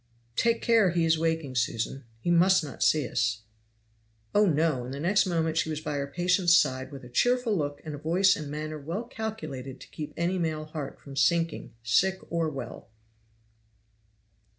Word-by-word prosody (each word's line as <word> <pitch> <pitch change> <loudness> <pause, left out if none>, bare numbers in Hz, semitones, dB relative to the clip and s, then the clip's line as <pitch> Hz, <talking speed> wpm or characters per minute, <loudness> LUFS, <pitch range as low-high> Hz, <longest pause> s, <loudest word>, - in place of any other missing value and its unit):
"Take 230 0 +1
care, 225 -5 +4
he 170 -1 +1
is 160 -1 +3
waking, 160 -4 -1
Susan. 120 +2 -2
He 175 - -1
must 180 +1 +5
not 145 -4 -8
see 150 -5 +3
us." 110 -2 0 0.9
"Oh, 210 0 +5
no!" 155 -5 +1
and 125 - -7
the 140 - -5
next 190 +5 +2
moment 165 -2 0
she 160 - +1
was 155 -1 -2
by 150 -2 -3
her 140 0 -2
patient's 175 +3 +3
side 130 -2 0
with 135 -2 -9
a - - -9
cheerful 245 - +2
look 145 -4 -2
and 150 -2 -6
voice 185 +5 +4
and 150 -2 -6
manner 155 +1 -5
well 165 +10 -4
calculated 215 - -6
to - - -12
keep 150 -1 -6
any 175 +3 0
male 155 -2 -2
heart 155 -3 -6
from 140 -1 -11
sinking, 165 +1 +1
sick 185 +12 +3
or 165 -2 0
well. 140 -3 -8
160 Hz, 175 wpm, -28 LUFS, 140-180 Hz, 0.9 s, must